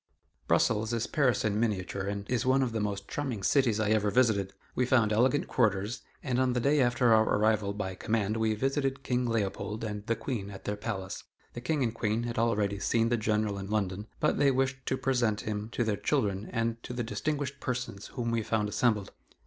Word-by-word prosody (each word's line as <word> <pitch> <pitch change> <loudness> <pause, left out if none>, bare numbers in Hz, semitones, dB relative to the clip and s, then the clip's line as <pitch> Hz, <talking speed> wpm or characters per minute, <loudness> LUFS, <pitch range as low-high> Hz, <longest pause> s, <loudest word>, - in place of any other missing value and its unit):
'" - - -41
Brussels 110 +1 +2
is 115 -1 0
Paris 130 -8 +1
in 105 0 +1
miniature 100 -4 -1
and 100 0 -4
is 125 0 0
one 130 +1 +3
of 125 - -1
the 110 - -2
most 100 -1 -3
charming 130 -9 -3
cities 120 -3 +3
I 110 -1 +1
ever 105 -1 +3
visited. 105 -5 +2 0.2
We 125 - +1
found 115 -5 +3
elegant 130 +6 +2
quarters, 105 -1 +1 0.2
and 130 -2 +1
the - - +2
day 140 +4 +3
after 120 -1 +4
our 110 - +6 0.2
arrival 105 -1 +2
by 100 -2 -4
command 110 +2 -1
we 110 -1 +1
visited 135 +3 -1
King 125 -1 0
Leopold 110 -1 -2
and 105 -2 -4
the 115 - +2
Queen 110 -3 -4
at 100 -1 -10
their 105 - -1
palace. 100 -3 -5 0.3
The 120 - -6
King 140 +2 0
and 115 -2 0
Queen 110 0 -1
had 120 -1 -2
already 105 -3 +1
seen 115 +2 +2
the 120 - +2
General 105 -2 0
in 95 0 -6
London, 105 -1 -1
but 150 - +1
they 145 - +5
wished 130 0 0
to 130 - +1
present 125 -5 +1
him 105 0 -4
to 120 - +1
their 110 -3 0
children 100 0 0
and 115 0 -1
to 125 - -7
the 120 0 -2
distinguished 140 +3 -2
persons 125 -7 -4
whom 120 -3 -3
we 115 -1 +1
found 105 -1 0
assembled. 105 -3 +1
115 Hz, 210 wpm, -30 LUFS, 105-125 Hz, 0.3 s, our